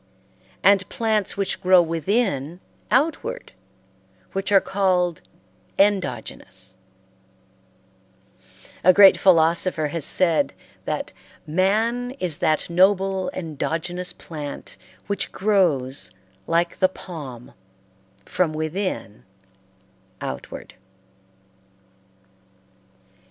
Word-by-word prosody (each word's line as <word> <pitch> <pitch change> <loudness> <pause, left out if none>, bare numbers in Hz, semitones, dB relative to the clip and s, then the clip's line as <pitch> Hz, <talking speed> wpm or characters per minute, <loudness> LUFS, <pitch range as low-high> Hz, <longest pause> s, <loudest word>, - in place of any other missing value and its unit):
and 195 -1 +4
plants 215 -4 0
which 195 -1 -2
grow 185 -1 +6
within 165 - 0 0.3
outward, 330 - 0 0.8
which 195 +1 -3
are 195 - +7
called 185 -4 0 0.6
endogenous 200 -1 -1 2.1
A 185 - +7
great 195 0 +8
philosopher 165 -2 +2
has 165 0 -4
said 170 0 +2 0.3
that - - -3 0.3
"man 220 - 0
is 170 -5 -1
that 155 -1 +1
noble 190 +1 +2
endogenous 165 +2 -3
plant 150 -3 -8 0.3
which 200 -2 -2
grows, 165 - +2 0.4
like 170 +1 0
the 185 - +4
palm, 145 -11 -9 0.7
from 175 -4 0
within 155 - -4 1.0
outward." - - -7
185 Hz, 75 wpm, -23 LUFS, 160-195 Hz, 2.1 s, great